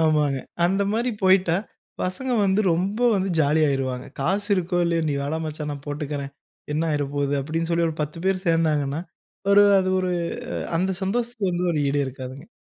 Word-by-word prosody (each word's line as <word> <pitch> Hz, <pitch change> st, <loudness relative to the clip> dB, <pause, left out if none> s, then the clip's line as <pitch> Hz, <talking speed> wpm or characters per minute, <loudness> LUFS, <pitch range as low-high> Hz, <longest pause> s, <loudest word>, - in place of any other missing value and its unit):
ஆமாங்க. 150 Hz, -3 st, +2 dB, 0.3 s
அந்த 195 Hz, +3 st, +2 dB
மாரி 235 Hz, +3 st, 0 dB
போய்ட்டா, 185 Hz, -2 st, +4 dB, 0.5 s
பசங்க 250 Hz, +8 st, -2 dB
வந்து 195 Hz, +1 st, +3 dB
ரொம்ப 190 Hz, +6 st, -1 dB, 0.2 s
வந்து 195 Hz, 0 st, 0 dB
ஜாலி 150 Hz, +1 st, +3 dB
ஆயிருவாங்க. 130 Hz, -2 st, -2 dB
காசு 195 Hz, +8 st, 0 dB
இருக்கோ, 180 Hz, -1 st, 0 dB
இல்லையோ. 170 Hz, -1 st, +1 dB
நீ 145 Hz, -, 0 dB
வாடா 150 Hz, +3 st, -2 dB
மச்சான் 150 Hz, -1 st, -4 dB
நான் 140 Hz, -1 st, -8 dB
போட்டுக்கிறேன், 145 Hz, -1 st, -4 dB, 0.4 s
என்ன 155 Hz, -, +1 dB
ஆய்ற 145 Hz, -2 st, 0 dB
போது 140 Hz, 0 st, 0 dB
அப்படின்னு 165 Hz, +4 st, -2 dB
சொல்லி 170 Hz, 0 st, +2 dB
ஒரு 160 Hz, -, -4 dB
10 150 Hz, +2 st, -5 dB
பேர் 190 Hz, 0 st, 0 dB
சேந்தாங்கன்னா, 155 Hz, -3 st, +1 dB, 0.5 s
ஒரு 205 Hz, 0 st, +8 dB, 0.2 s
அது 185 Hz, -, -1 dB
ஒரு 185 Hz, -1 st, -1 dB, 0.7 s
அந்த 190 Hz, +2 st, +1 dB
சந்தோஷத்துக்கு 225 Hz, 0 st, -1 dB
வந்து 175 Hz, +1 st, 0 dB
ஒரு 155 Hz, -, 0 dB
ஈடே 140 Hz, +1 st, +1 dB
இருக்காதுங்க. 130 Hz, +1 st, -8 dB
165 Hz, 170 wpm, -24 LUFS, 145-190 Hz, 0.7 s, ஒரு